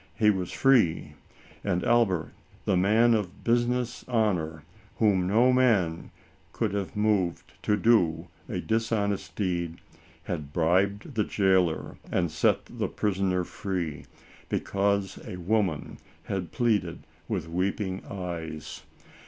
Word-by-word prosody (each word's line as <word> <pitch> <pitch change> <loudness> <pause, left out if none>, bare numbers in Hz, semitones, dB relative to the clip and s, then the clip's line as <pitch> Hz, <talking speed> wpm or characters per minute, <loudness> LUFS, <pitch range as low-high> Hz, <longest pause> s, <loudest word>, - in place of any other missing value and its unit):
He 105 -2 +4
was 95 -3 -3
free; 125 -12 +3 0.5
and 90 0 0
Albert, 110 -8 +2 0.3
the 95 - +2
man 110 +6 +4
of 100 -5 -2
business 120 +1 0
honor, 90 -10 0 0.3
whom 95 -5 +2
no 120 +6 +4
man 105 -11 +2 0.4
could 110 -4 -1
have 100 -1 -3
moved 105 -5 0
to 105 - +1
do 105 -7 +3 0.2
a - - -2
dishonest 110 -3 -1
deed, 85 -4 -2 0.5
had 75 -4 -5
bribed 95 - +1
the 110 -3 +1
jailor 95 -5 +1
and 85 -3 +1
set 80 - +2
the - - -3
prisoner 95 -3 0
free, 85 -7 -4 0.4
because 100 -1 0
a - - -7
woman 90 -3 -1 0.2
had 95 -3 -4
pleaded, 100 - 0 0.2
with 95 -7 -2
weeping 95 +2 -2
eyes. 85 -5 -6
95 Hz, 120 wpm, -27 LUFS, 85-110 Hz, 0.5 s, He